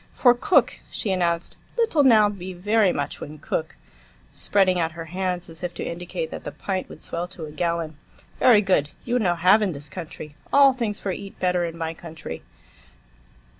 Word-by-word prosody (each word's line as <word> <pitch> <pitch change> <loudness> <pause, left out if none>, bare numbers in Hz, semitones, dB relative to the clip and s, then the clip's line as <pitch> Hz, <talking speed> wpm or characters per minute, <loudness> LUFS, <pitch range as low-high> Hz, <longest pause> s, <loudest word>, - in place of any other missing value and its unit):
"For 245 -2 +6
cook," 245 +9 +2
she 205 - -2
announced. 170 -2 -1 0.2
"Little 450 -10 +3
now; 220 -5 +6
be 190 -2 -6
very 205 +2 +3
much 145 -3 -3
when 150 +1 -7
cook," 160 +1 -3 0.6
spreading 185 -3 +2
out 165 -1 0
her 165 0 -7
hands 180 -1 -2
as 165 +1 -9
if 175 -1 -3
to - - -4
indicate 170 -1 -4
that - - -7
the - - -5
pint 190 -2 -3
would - - -10
swell 170 +1 -4
to 180 -3 -8
a 150 - -9
gallon. 165 -1 -2 0.4
"Very 220 -4 +6
good. 185 -7 +2 0.2
You 245 +1 +1
no 180 -6 +2
have 185 +5 +5
in 195 -4 0
this 145 0 -7
country. 155 -4 -8 0.2
All 275 -1 +7
things 230 -5 -2
for 195 - -2
eat 195 +1 -7
better 180 -1 +1
in 165 0 -6
my 165 -1 -3
country." 160 - -8
180 Hz, 190 wpm, -24 LUFS, 165-205 Hz, 0.6 s, All